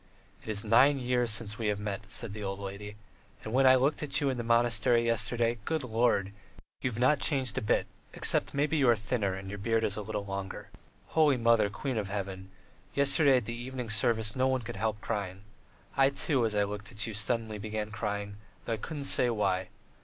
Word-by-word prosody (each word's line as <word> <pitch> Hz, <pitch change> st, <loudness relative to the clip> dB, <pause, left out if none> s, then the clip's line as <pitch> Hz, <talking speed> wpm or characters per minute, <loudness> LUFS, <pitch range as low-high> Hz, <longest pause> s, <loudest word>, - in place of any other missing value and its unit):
"It -, -, -11 dB
is 105 Hz, 0 st, +1 dB
nine 125 Hz, +6 st, +5 dB
years 125 Hz, -2 st, 0 dB
since 105 Hz, 0 st, -3 dB
we 110 Hz, -, -1 dB
have 105 Hz, -1 st, 0 dB
met," 100 Hz, -1 st, -5 dB
said 115 Hz, -1 st, -4 dB
the 105 Hz, -, -7 dB
old 95 Hz, 0 st, -3 dB
lady. 100 Hz, +1 st, -7 dB, 0.5 s
"And 110 Hz, -, -6 dB
when 135 Hz, +1 st, +4 dB
I 130 Hz, -, +8 dB
looked 135 Hz, +4 st, +1 dB
at 150 Hz, -, 0 dB
you 140 Hz, -2 st, +1 dB
in 130 Hz, -, -4 dB
the 120 Hz, -, -3 dB
monastery 115 Hz, 0 st, +3 dB
yesterday, 115 Hz, +1 st, 0 dB
good 160 Hz, +4 st, -2 dB
Lord! 115 Hz, -4 st, +1 dB, 0.5 s
you've 125 Hz, -4 st, -2 dB
not 130 Hz, +4 st, +3 dB
changed 135 Hz, -7 st, +1 dB
a -, -, -9 dB
bit, 105 Hz, -, +1 dB, 0.3 s
except -, -, +2 dB
maybe 150 Hz, +3 st, +1 dB
you 135 Hz, -4 st, +4 dB
are 120 Hz, -, +6 dB
thinner 105 Hz, -2 st, -2 dB
and 95 Hz, 0 st, -8 dB
your 105 Hz, -, -6 dB
beard 115 Hz, +2 st, 0 dB
is 105 Hz, -1 st, -1 dB
a -, -, -3 dB
little 105 Hz, -1 st, -4 dB
longer. 95 Hz, -1 st, -6 dB, 0.4 s
Holy 150 Hz, -4 st, +3 dB
Mother, 115 Hz, -3 st, +3 dB
Queen 125 Hz, +4 st, -4 dB
of 100 Hz, -2 st, -4 dB
Heaven! 95 Hz, -1 st, -5 dB, 0.5 s
Yesterday 140 Hz, -1 st, +5 dB
at 125 Hz, -, -2 dB
the 115 Hz, -, -4 dB
evening 120 Hz, -1 st, -4 dB
service 110 Hz, +1 st, +3 dB
no 130 Hz, 0 st, +2 dB
one 130 Hz, -1 st, 0 dB
could 105 Hz, -, -7 dB
help 110 Hz, +1 st, -1 dB
crying. 100 Hz, -3 st, -4 dB, 0.5 s
I, 135 Hz, 0 st, +5 dB
too, 135 Hz, -3 st, 0 dB
as 105 Hz, -, -4 dB
I 105 Hz, -, +3 dB
looked 105 Hz, +3 st, -6 dB
at 105 Hz, -3 st, -1 dB
you, 110 Hz, -, -5 dB
suddenly 110 Hz, 0 st, -1 dB
began 110 Hz, 0 st, -4 dB
crying, 105 Hz, -1 st, -4 dB, 0.3 s
though 115 Hz, -, -1 dB
I -, -, -2 dB
couldn't 145 Hz, +6 st, -6 dB
say 125 Hz, -2 st, +3 dB
why. 95 Hz, -5 st, 0 dB
115 Hz, 215 wpm, -30 LUFS, 105-125 Hz, 0.5 s, I